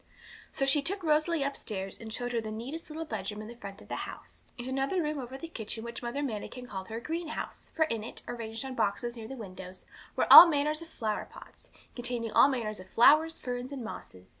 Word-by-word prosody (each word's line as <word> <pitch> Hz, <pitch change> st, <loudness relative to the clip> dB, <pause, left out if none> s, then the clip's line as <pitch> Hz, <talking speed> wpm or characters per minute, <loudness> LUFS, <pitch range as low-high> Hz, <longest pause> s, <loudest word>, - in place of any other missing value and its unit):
So 270 Hz, -, 0 dB
she 275 Hz, +2 st, +4 dB
took 380 Hz, +6 st, -2 dB
Rosalie 310 Hz, 0 st, +2 dB
upstairs, 205 Hz, -8 st, -3 dB
and 225 Hz, -1 st, -8 dB
showed 245 Hz, +2 st, -3 dB
her 235 Hz, -1 st, 0 dB
the 220 Hz, -, -6 dB
neatest 250 Hz, +11 st, -6 dB
little 320 Hz, +1 st, -5 dB
bedroom 210 Hz, -5 st, -4 dB
in 215 Hz, -, -7 dB
the 235 Hz, -, -9 dB
front 200 Hz, -4 st, -9 dB
of -, -, -17 dB
the -, -, -4 dB
house, -, -, -8 dB
and 240 Hz, 0 st, -5 dB
another 270 Hz, +7 st, 0 dB
room 305 Hz, -3 st, -1 dB
over 260 Hz, +1 st, -6 dB
the 330 Hz, -, -7 dB
kitchen 225 Hz, -6 st, -4 dB
which 235 Hz, 0 st, -6 dB
Mother 245 Hz, +4 st, -3 dB
Manikin 245 Hz, 0 st, -5 dB
called 190 Hz, -5 st, -6 dB
her 225 Hz, +2 st, -4 dB
greenhouse, 325 Hz, +4 st, -5 dB
for 315 Hz, -, +4 dB
in 230 Hz, -8 st, -3 dB
it, 230 Hz, -, -6 dB
arranged 230 Hz, +1 st, -5 dB
on 265 Hz, -, -5 dB
boxes 235 Hz, +1 st, -1 dB
near 225 Hz, -2 st, -8 dB
the 270 Hz, -, -7 dB
window, 185 Hz, -5 st, -8 dB, 0.4 s
were -, -, +2 dB
all 350 Hz, -, +14 dB
manner 295 Hz, -2 st, +1 dB
of 305 Hz, -, -2 dB
flowerpots, 230 Hz, -10 st, -6 dB, 0.3 s
containing 240 Hz, -2 st, -2 dB
all -, -, +7 dB
manner 245 Hz, -6 st, -1 dB
of 190 Hz, -3 st, -8 dB
flowers, 305 Hz, +9 st, +5 dB
ferns, 250 Hz, +1 st, -4 dB
and 270 Hz, -3 st, -5 dB
mosses. 95 Hz, -, -9 dB
245 Hz, 215 wpm, -30 LUFS, 220-290 Hz, 0.4 s, all